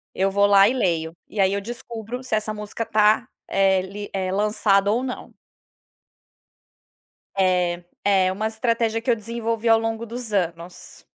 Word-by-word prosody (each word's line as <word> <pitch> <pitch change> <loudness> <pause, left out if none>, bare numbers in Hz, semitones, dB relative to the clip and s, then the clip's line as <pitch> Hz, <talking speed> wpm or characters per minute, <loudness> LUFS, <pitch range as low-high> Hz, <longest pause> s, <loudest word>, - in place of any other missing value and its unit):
Eu 195 +1 +1
vou 200 +1 +3
lá 200 0 +6
e 250 - +1
leio, 165 -8 -1
e 210 - -8
aí 195 0 +3
eu 200 - -1
descubro 235 +2 -7
se 245 - -1
essa 215 0 -2
música 210 +2 -5
tá, 215 +2 +3 0.2
eh, 195 -1 +3
li 205 +2 -7
eh, 185 -1 -2
lançada 205 0 +2
ou 240 +4 0
não. 250 -1 -6 2.1
É, 180 -2 +1 0.2
é 190 -2 +3
uma 215 +3 -2
estratégia 225 0 0
que 245 - -4
eu 235 - +3
desenvolvi 230 +1 -3
ao 225 0 +6
longo 225 0 -3
dos 235 -1 -6
anos. 175 -2 -4
210 Hz, 160 wpm, -23 LUFS, 195-225 Hz, 2.1 s, lá